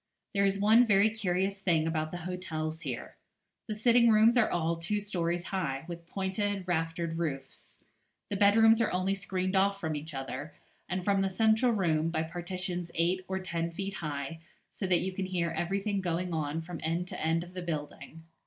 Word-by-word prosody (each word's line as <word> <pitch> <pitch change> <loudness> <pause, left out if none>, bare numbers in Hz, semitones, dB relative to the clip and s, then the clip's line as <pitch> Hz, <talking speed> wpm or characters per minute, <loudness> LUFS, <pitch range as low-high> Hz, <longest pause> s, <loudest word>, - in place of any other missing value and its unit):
There 200 -1 +3
is 195 0 0
one 220 +4 +5
very 205 +1 +5
curious 195 -2 -1
thing 165 -5 +2
about 155 -1 -1
the 175 - -5
hotels 160 -3 -4
here. 130 -7 -6 0.5
The 215 - -3
sitting 235 +2 +5
rooms 220 +2 +6
are 240 -3 +4
all 165 -1 0
two 190 +6 -1
stories 175 -4 -2
high, 150 -7 -2
with 170 -1 -8
pointed 195 +1 -2
raftered 165 -1 -1
roofs. 135 -5 -5 0.5
The - - 0
bedrooms 225 +3 +6
are 225 - +1
only 185 +2 +1
screened 185 -1 -2
off 195 +1 +3
from 160 -4 -2
each 150 0 -6
other, 135 +3 -5 0.3
and 185 0 -2
from 200 -1 +3
the 195 - +1
central 220 +5 +3
room, 165 -6 +1
by 160 -1 0
partitions 175 +1 -4
eight 175 +3 +1
or 190 - -2
ten 170 -3 -2
feet 195 +3 -4
high, 150 -2 -4 0.3
so 190 - -4
that 180 -2 +3
you 190 - -1
can 185 0 -3
hear 175 -3 -1
everything 195 +5 -1
going 175 0 -2
on 155 0 -2
from 170 -1 -7
end 170 +3 -1
to - - -5
end 165 +1 +1
of 175 +1 -13
the 185 - -5
building. 160 -1 -6
180 Hz, 190 wpm, -30 LUFS, 165-195 Hz, 0.5 s, rooms